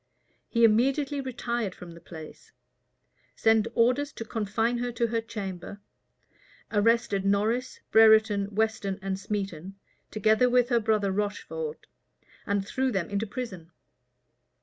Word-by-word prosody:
[*] - - -43
He 235 -1 +2
immediately 270 +6 +3
retired 235 -5 -3
from 175 -1 -10
the 170 0 -13
place; 160 -2 -12 0.8
sent 225 -1 +3
orders 255 +5 +2
to 225 - -7
confine 225 +2 -1
her 245 0 -2
to 235 - 0
her 230 0 -1
chamber; 200 -3 -7 0.9
arrested 210 -2 +2
Norris, 215 +6 0
Brereton, 220 -2 +5
Weston, 220 -3 0
and 195 -1 -2
Smeton, 195 -3 -4 0.3
together 220 +3 +3
with 245 0 +3
her 240 -2 +3
brother 215 -3 +1
Rocheford; 210 - -4 0.6
and 200 -1 0
threw 260 +3 0
them 190 -3 -2
into 200 +2 -1
prison. 195 -8 -6
220 Hz, 125 wpm, -27 LUFS, 200-240 Hz, 0.9 s, Brereton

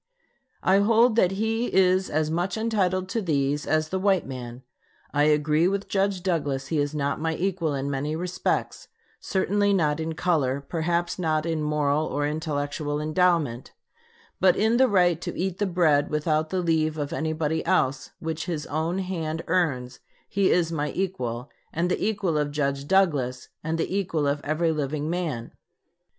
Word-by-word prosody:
I 190 +1 +4
hold 225 +3 +4
that 185 -4 +4
he 225 +4 -1
is 185 0 +3
as 155 +1 0
much 175 +6 -1
entitled 190 -5 0
to 225 +3 -1
these 145 -4 0
as 155 0 +1
the 190 - -1
white 190 -1 +2
man. 125 -1 -7 0.5
I 145 0 +3
agree 150 +2 +3
with 200 +1 -1
Judge 195 -2 0
Douglas 145 -7 -1
he 160 - 0
is 145 +1 -1
not 140 0 -1
my 160 0 0
equal 175 -5 -1
in 135 0 -2
many 140 +2 -2
respects 180 +2 -2 0.3
certainly 200 +1 +1
not 155 -5 +1
in 160 0 -2
color, 155 -6 +1
perhaps 170 +4 -2
not 155 -2 0
in 165 -2 -1
moral 150 0 +1
or 145 0 -1
intellectual 145 -1 -2
endowment; 155 -5 +1 0.7
but 185 -1 +4
in 220 +3 +3
the 260 +1 +5
right 180 -6 +3
to - - -5
eat 185 0 -2
the 205 - +1
bread 160 -5 +2
without 155 +1 0
the 185 +1 -1
leave 160 -2 +1
of 145 -1 -3
anybody 160 0 -1
else, 135 +1 +1
which 160 +1 -4
his 160 -4 -3
own 160 +4 -2
hand 165 -4 -3
earns, 140 -8 0 0.3
he 195 -1 +1
is 170 -2 +2
my 150 -2 -1
equal, 130 -10 -3 0.2
and 175 +3 -1
the - - -1
equal 195 -7 0
of 145 -1 0
Judge 140 -1 -2
Douglas 145 -10 +1
and 160 +1 -1
the 165 +3 -2
equal 170 -6 0
of 145 +1 0
every 160 +2 +1
living 150 0 -2
man." 160 -10 -3
160 Hz, 170 wpm, -25 LUFS, 145-185 Hz, 0.7 s, the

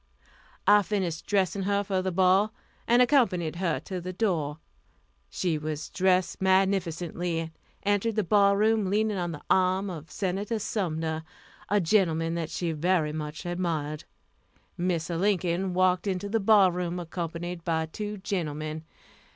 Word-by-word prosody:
I 205 0 +7
finished 185 -5 -2
dressing 195 -1 +1
her 200 +1 +1
for 190 -2 -1
the 185 0 -2
ball, 190 +4 +3 0.3
and 240 +2 +6
accompanied 185 - +2
her 175 -3 0
to 185 -2 -5
the 180 +1 -5
door. 170 -7 -1 0.7
She 170 -4 -1
was 155 0 -5
dressed 185 -1 +1
magnificently, 180 -3 +1
and 165 0 -6 0.3
entered 205 +2 +1
the 215 - +1
ball 200 +1 +4
room 215 -2 +2
leaning 210 +1 +1
on 175 -1 -2
the 150 - -8
arm 190 +1 +2
of 160 -2 -8
Senator 200 +4 -2
Sumner, 160 -7 -2 0.5
a 205 - +3
gentleman 165 -3 +2
that 165 -2 -3
she 170 -2 -2
very 160 -1 +1
much 155 +2 -5
admired. 165 -4 -2 0.7
Mr. 170 -1 -1
Lincoln 185 -2 0
walked 185 +1 +2
into 190 +1 -2
the 225 +2 +1
ball 200 -2 +5
room 180 0 -3
accompanied 170 0 -5
by 160 -2 0
two 210 +6 -5
gentlemen. 155 -5 -3
180 Hz, 145 wpm, -27 LUFS, 165-200 Hz, 0.7 s, I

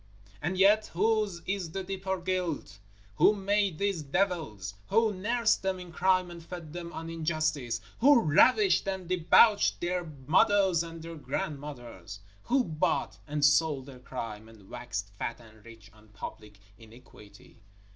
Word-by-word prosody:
_ - - -25
And 175 +5 -2
yet 210 +3 +5
whose 210 -2 +1
is 190 -5 -3
the 195 - -3
deeper 190 0 -3
guilt? 175 - -3 0.4
Who 210 - +5
made 200 -3 0
these 200 -3 -1
devils? 145 - -2
Who 220 0 +2
nursed 225 +4 +1
them 190 -1 -2
in 180 -1 -10
crime 185 +1 +1
and 170 -1 -10
fed 170 -3 -9
them 170 -1 -6
on 165 0 -7
injustice? 155 -6 -2 0.2
Who 280 +1 +6
ravished 255 - +4
and 190 -2 -3
debauched 185 +4 +4
their 180 +1 -1 0.2
mothers 190 - +4
and 165 -1 -8
their 165 0 -8
grandmothers? 120 - -6 0.3
Who 260 +1 +2
bought 160 -1 -1
and 150 -1 +1
sold 150 -2 +3
their 135 -2 -12
crime, 110 -4 -7
and 105 -4 -17
waxed 120 -5 -5
fat 120 - -4
and 110 -2 -17
rich 115 -2 -15
on 110 0 -20
public 105 0 -10 0.2
iniquity? 115 -4 -17
165 Hz, 150 wpm, -29 LUFS, 125-190 Hz, 0.4 s, Who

